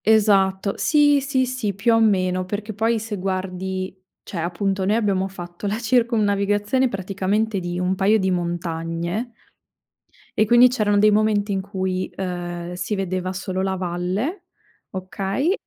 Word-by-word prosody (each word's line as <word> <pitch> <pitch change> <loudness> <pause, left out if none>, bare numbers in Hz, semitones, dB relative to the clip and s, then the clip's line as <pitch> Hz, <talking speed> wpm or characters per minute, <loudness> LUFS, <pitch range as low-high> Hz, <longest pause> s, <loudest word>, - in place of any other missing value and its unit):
Esatto. 200 -2 +3
Sì, 290 -2 +4
sì, 265 -1 +1
sì, 250 -5 -2
più 225 +4 +2
o 225 - +4
meno. 185 -4 +2
Perché 205 +3 -4
poi 225 +3 +1
se 215 -1 -5
guardi, 185 0 -3 0.3
cioè 180 - -6
appunto 190 +3 -1
noi 200 +3 +2
abbiamo 200 -4 +1
fatto 175 0 -7
la 205 +2 -1
circumnavigazione 220 0 +2
praticamente 195 +2 -1
di 175 -1 -4
un 180 +1 +1
paio 200 +3 +3
di 190 -2 0
montagne 170 +4 -2 1.1
e 215 - +4
quindi 240 +3 +7
c'erano 210 -5 +1
dei 210 +1 +5
momenti 210 -1 +2
in 195 - 0
cui, 190 -1 -3
uhm, 175 -2 -4
si 180 +4 -3
vedeva 185 -1 -2
solo 185 0 -3
la 190 0 0
valle, 185 - -2 0.5
okay, 195 - -1
195 Hz, 145 wpm, -22 LUFS, 185-220 Hz, 1.1 s, quindi